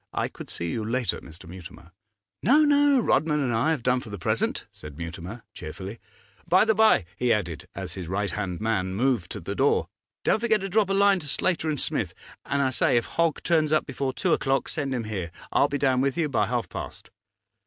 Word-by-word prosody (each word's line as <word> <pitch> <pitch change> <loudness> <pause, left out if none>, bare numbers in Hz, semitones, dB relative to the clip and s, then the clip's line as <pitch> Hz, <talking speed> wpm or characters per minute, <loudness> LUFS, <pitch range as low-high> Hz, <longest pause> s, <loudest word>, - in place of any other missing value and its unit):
'I - - -1
could - - -10
see 85 -1 -3
you 110 - -2
later, 120 +2 -1
Mr. 85 +3 -12
Mutimer.' 90 0 -11 0.5
'No, 295 +5 +5
no; 290 -2 +4
Rodman 150 -4 +2
and 130 -4 0
I 115 +8 +2
have 155 -7 0
done 125 +1 +2
for 120 - -10
the 100 - -6
present,' 85 - -1
said 75 -1 -10
Mutimer, 90 +7 -7
cheerfully. 95 +8 -7 0.5
'By 185 +4 +5
the 220 - +4
by,' 220 - +4
he 125 +1 +1
added, 85 -8 -1
as 90 -3 -5
his 90 -3 -6
right 100 +3 -1
hand 95 -4 -3
man 105 -4 -1
moved 120 -5 +1
to - - -5
the - - -5
door, - - +2 0.3
'don't - - +3
forget 220 -2 +2
to 195 - -3
drop 205 0 +2
a - - +1
line 200 -1 +4
to 150 - -6
Slater 165 +1 0
and 150 -3 -1
Smith. - - -2 0.3
And, 140 +1 +1
I 130 - +1
say, 120 - +3
if 115 - +1
Hogg 165 -2 0
turns 155 -3 +2
up 155 - +3
before 135 -1 -2
two 175 +5 +1
o'clock, 135 0 +1
send 140 -4 -2
him 120 - -2
here; 100 -6 -4 0.2
I'll - - +4
be 145 - -1
down 130 -2 +2
with 135 +3 0
you 160 -3 +1
by 130 - +1
half - - -1
past. - - -8
130 Hz, 220 wpm, -26 LUFS, 95-160 Hz, 0.5 s, No